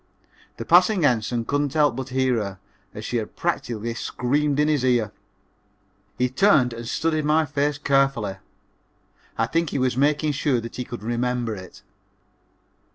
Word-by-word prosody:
The -, -, -6 dB
passing 200 Hz, -8 st, +5 dB
ensign 120 Hz, -2 st, +1 dB
couldn't 145 Hz, +2 st, -1 dB
help 150 Hz, -5 st, +3 dB
but 130 Hz, +1 st, -5 dB
hear 130 Hz, -1 st, +1 dB
her, 100 Hz, -3 st, -4 dB, 0.3 s
as 105 Hz, -, -8 dB
she 120 Hz, -, -1 dB
had 110 Hz, -2 st, -5 dB
practically 115 Hz, 0 st, -2 dB
screamed 140 Hz, +5 st, -1 dB
in 150 Hz, -, +3 dB
his 150 Hz, -4 st, +1 dB
ear. 120 Hz, -5 st, +2 dB, 1.1 s
He 125 Hz, -, +2 dB
turned 130 Hz, -, +3 dB
and 115 Hz, 0 st, -7 dB
studied 155 Hz, +3 st, 0 dB
my 155 Hz, +2 st, +3 dB
face 145 Hz, 0 st, -1 dB
carefully. 135 Hz, -9 st, +1 dB, 1.0 s
I 115 Hz, -, +2 dB
think 165 Hz, +7 st, 0 dB
he -, -, -3 dB
was 130 Hz, -2 st, +1 dB
making 150 Hz, +3 st, +2 dB
sure 140 Hz, -3 st, 0 dB
that 115 Hz, 0 st, -8 dB
he 125 Hz, -, -3 dB
could 120 Hz, -3 st, -8 dB
remember 120 Hz, 0 st, -1 dB
it. 95 Hz, -2 st, -12 dB
130 Hz, 160 wpm, -23 LUFS, 115-145 Hz, 1.1 s, passing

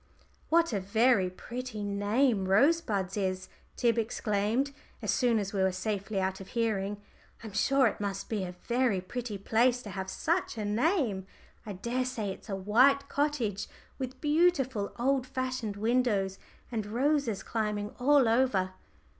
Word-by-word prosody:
"What 335 Hz, -4 st, +3 dB
a 205 Hz, -, +1 dB
very 200 Hz, 0 st, +3 dB
pretty 235 Hz, +3 st, -6 dB
name 205 Hz, +1 st, +1 dB
'Rosebuds' 205 Hz, -, +2 dB
is," 185 Hz, -2 st, -2 dB, 0.3 s
Tib 235 Hz, -1 st, +2 dB
exclaimed, 220 Hz, +4 st, 0 dB, 0.3 s
as -, -, -1 dB
soon 245 Hz, -4 st, +2 dB
as 200 Hz, -1 st, -2 dB
we 195 Hz, -, 0 dB
were 190 Hz, 0 st, +3 dB
safely 200 Hz, +1 st, -2 dB
out 190 Hz, 0 st, -2 dB
of 190 Hz, -, -9 dB
hearing. 205 Hz, -3 st, 0 dB, 0.4 s
"I'm 220 Hz, -3 st, -8 dB
sure 270 Hz, +6 st, +3 dB
it 215 Hz, -, 0 dB
must 195 Hz, -1 st, -3 dB
be 210 Hz, -4 st, -2 dB
a 180 Hz, -1 st, -6 dB
very 240 Hz, -5 st, +1 dB
pretty 225 Hz, +3 st, -5 dB
place 240 Hz, +5 st, +2 dB
to 205 Hz, -, -7 dB
have 190 Hz, 0 st, -4 dB
such 335 Hz, -, -1 dB
a 215 Hz, -, -2 dB
name. 220 Hz, -, +1 dB, 0.4 s
I 205 Hz, -, -4 dB
daresay 235 Hz, 0 st, -2 dB
it's -, -, -15 dB
a 195 Hz, -, -1 dB
white 255 Hz, +9 st, +3 dB
cottage, 250 Hz, -9 st, -1 dB, 0.3 s
with 260 Hz, 0 st, -5 dB
beautiful 295 Hz, -, +2 dB
old 260 Hz, +1 st, +1 dB
fashioned 255 Hz, -5 st, -3 dB
windows, 215 Hz, -4 st, +1 dB, 0.3 s
and 220 Hz, -3 st, -2 dB
roses 255 Hz, -1 st, 0 dB
climbing 210 Hz, -2 st, -2 dB
all 275 Hz, 0 st, +5 dB
over." 225 Hz, -6 st, +2 dB
220 Hz, 150 wpm, -30 LUFS, 200-255 Hz, 0.4 s, all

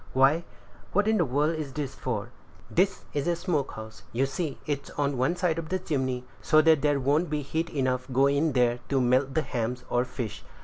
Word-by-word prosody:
"Why, 135 Hz, +6 st, +4 dB, 0.5 s
what 205 Hz, +2 st, +3 dB
in 220 Hz, 0 st, +3 dB
the 175 Hz, -, +3 dB
world 150 Hz, +5 st, +1 dB
is 140 Hz, -4 st, -5 dB
this 140 Hz, -2 st, -3 dB
for?" 120 Hz, -2 st, -4 dB, 0.4 s
"This 190 Hz, +2 st, +2 dB
is 145 Hz, +1 st, -1 dB
a 175 Hz, -, +2 dB
smoke 165 Hz, -5 st, -1 dB
house; 110 Hz, -1 st, -9 dB
you 130 Hz, +4 st, +1 dB
see 150 Hz, +2 st, -3 dB
it's 145 Hz, -1 st, -3 dB
on 140 Hz, -1 st, +1 dB
one 130 Hz, +7 st, +1 dB
side 175 Hz, -3 st, 0 dB
of 160 Hz, -, -6 dB
the 185 Hz, -, +1 dB
chimney, 130 Hz, -8 st, -2 dB, 0.2 s
so 155 Hz, -, +4 dB
that 160 Hz, -3 st, +5 dB
there 145 Hz, -2 st, +2 dB
won't 145 Hz, +6 st, +2 dB
be 150 Hz, -1 st, -1 dB
heat 160 Hz, +4 st, -2 dB
enough 130 Hz, -2 st, -1 dB
go 135 Hz, +2 st, +4 dB
in 140 Hz, +2 st, +2 dB
there 120 Hz, -1 st, +2 dB
to 135 Hz, -, +2 dB
melt 130 Hz, +2 st, +2 dB
the 160 Hz, -, +2 dB
hams 120 Hz, -1 st, -3 dB
or 120 Hz, 0 st, +3 dB
fish. 125 Hz, -4 st, -5 dB
140 Hz, 215 wpm, -27 LUFS, 130-160 Hz, 0.5 s, that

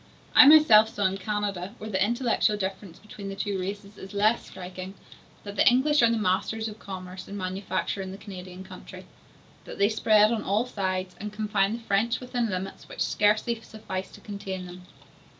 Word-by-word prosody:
I 290 Hz, -, +9 dB
myself 285 Hz, -8 st, +8 dB
saw 205 Hz, -2 st, -2 dB
in 190 Hz, +1 st, 0 dB
Canada, 205 Hz, -1 st, -3 dB
where 215 Hz, 0 st, -7 dB
the 190 Hz, -1 st, +2 dB
intellectual 235 Hz, -1 st, +1 dB
difference 190 Hz, -2 st, -5 dB
between 205 Hz, -1 st, -9 dB
the 195 Hz, -, -5 dB
two 195 Hz, 0 st, -2 dB
races 200 Hz, +2 st, -6 dB
is 195 Hz, +2 st, -10 dB
less 215 Hz, +3 st, +2 dB
striking, 185 Hz, +1 st, -8 dB, 0.5 s
that 200 Hz, -1 st, -8 dB
the -, -, +4 dB
English 285 Hz, +4 st, +3 dB
are 235 Hz, -, +5 dB
the 230 Hz, -, +1 dB
masters 220 Hz, +2 st, 0 dB
of 215 Hz, 0 st, -9 dB
commerce 185 Hz, -1 st, -8 dB
and 200 Hz, -, -7 dB
manufacture 185 Hz, +1 st, -3 dB
in 190 Hz, -1 st, -6 dB
the 195 Hz, -, -8 dB
Canadian 185 Hz, -2 st, -9 dB
country, 185 Hz, -1 st, -11 dB, 0.6 s
that -, -, -9 dB
they 200 Hz, +1 st, +3 dB
spread 215 Hz, -1 st, +4 dB
on 225 Hz, -2 st, 0 dB
all 205 Hz, +5 st, 0 dB
sides, 185 Hz, -5 st, -3 dB
and 210 Hz, 0 st, -5 dB
confine 210 Hz, -1 st, 0 dB
the 230 Hz, 0 st, -6 dB
French 225 Hz, +3 st, +1 dB
within 245 Hz, -2 st, -2 dB
limits 185 Hz, 0 st, -5 dB
which -, -, -7 dB
scarcely 215 Hz, +2 st, +1 dB
suffice 190 Hz, -4 st, -6 dB
to -, -, -13 dB
contain 195 Hz, -2 st, -6 dB
them. 180 Hz, 0 st, -11 dB
205 Hz, 185 wpm, -27 LUFS, 190-220 Hz, 0.6 s, I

